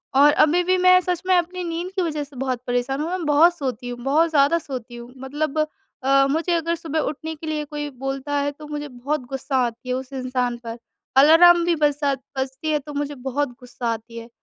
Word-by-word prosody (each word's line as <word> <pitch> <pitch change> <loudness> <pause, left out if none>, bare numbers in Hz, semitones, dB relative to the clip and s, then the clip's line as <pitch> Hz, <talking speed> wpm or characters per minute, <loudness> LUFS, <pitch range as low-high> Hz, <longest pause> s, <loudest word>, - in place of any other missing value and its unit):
और 290 +2 +7
अभी 340 +4 +3
भी 370 +1 +2
मैं 365 0 +6
सच 360 -1 -2
में 370 - +5
अपनी 360 +1 -2
नींद 345 +2 -4
की 380 - +1
वजह 305 -4 -2
से 280 -1 -15
बहुत 255 -1 -2
परेशान 245 +3 -1
हूँ, 315 - -2
मैं 365 -2 -3
बहुत 315 +4 +5
सोती 250 -4 -4
हूँ, 245 0 -6
बहुत 310 +5 +3
ज़्यादा 290 +1 +4
सोती 255 -5 -7
हूँ 240 +1 -10
मतलब 295 +3 -3 0.4
अ, 275 +1 +4
मुझे 330 +3 0
अगर 335 0 0
सुबह 320 -1 -3
उठने 315 +2 -3
के 315 +1 -9
लिए 305 -1 -2
कोई 295 0 -5
बोलता 270 +2 -5
है 285 0 0
तो 300 +1 -12
मुझे 295 0 -5
बहुत 275 +4 -3
गुस्सा 270 0 -2
आती 235 +2 -7
है 250 - +1
उस 260 +1 -6
इंसान 255 -2 -2
पर। 230 0 -5 0.4
अलार्म 340 +4 +7
भी 345 -1 +2
बजा 290 -2 +1 0.2
बजती 265 +4 -2
है 300 - +2
तो 295 +1 -10
मुझे 290 0 -3
बहुत 270 +2 -2
गुस्सा 250 -1 -6
आती 230 +1 -9
है। 230 +1 -8
290 Hz, 220 wpm, -22 LUFS, 260-320 Hz, 0.4 s, और